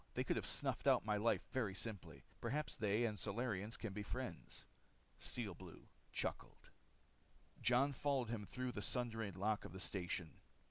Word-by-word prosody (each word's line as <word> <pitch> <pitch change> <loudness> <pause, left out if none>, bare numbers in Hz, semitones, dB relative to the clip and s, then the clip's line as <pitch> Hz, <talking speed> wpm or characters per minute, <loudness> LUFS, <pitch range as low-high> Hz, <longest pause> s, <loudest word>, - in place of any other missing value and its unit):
They - - +2
could - - +1
have - - 0
snuffed - - +2
out - - +6
my 105 -1 +3
life 115 +3 +3
very 110 -8 +1
simply. 90 - -3 0.2
Perhaps 145 +6 0
they 110 +1 +3
and 105 -2 -1
Solarians 110 -1 -1
can 115 -4 -3
be 105 - -2
friends. 90 - -4 0.5
Steel 110 -6 -2
Blue 85 0 -10 0.3
chuckled. - - -3 0.9
Jon 125 +5 +5
followed 135 -3 +1
him 115 -3 -1
through 125 +4 -2
the 105 - -3
sundered 115 -4 0
lock 105 +2 +2
of - - -7
the 95 - -5
station. 90 -3 -1
110 Hz, 165 wpm, -42 LUFS, 95-120 Hz, 0.9 s, out